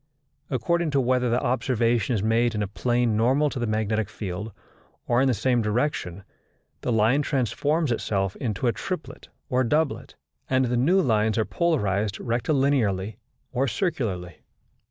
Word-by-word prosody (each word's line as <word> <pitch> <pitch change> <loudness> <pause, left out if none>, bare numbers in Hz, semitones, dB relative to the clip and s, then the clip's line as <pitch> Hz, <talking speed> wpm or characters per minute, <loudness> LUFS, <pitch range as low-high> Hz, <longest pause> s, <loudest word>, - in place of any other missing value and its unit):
According 170 +5 0
to 140 - +2
whether 125 -1 +1
the 120 +2 +2
observation 120 -1 +1
is 100 - -1
made 115 +1 +2
in 105 - 0
a - - -2
plane 120 +2 0
normal 135 +7 +2
to 130 - -4
the 120 - -1
magnetic 110 -1 0
field 100 +2 -5 0.5
or 120 +1 +2
in 135 - +3
the 130 - +3
same 125 +3 +1
direction, 105 - -1 0.6
the - - -1
line 115 +6 +3
transforms 145 +3 0
itself 95 -4 -1
into 110 -1 -3
a 120 - +4
triplet 180 -4 -6 0.2
or 130 -2 +1
doublet, 150 +4 -1 0.3
and 130 0 +3
the 125 0 -1
new 160 +11 +3
lines 110 - +2
are 110 - +2
polarized 105 - 0
rectilinearly 120 -6 0 0.3
or 135 +3 0
circularly. 105 - -2
120 Hz, 155 wpm, -25 LUFS, 110-135 Hz, 0.6 s, a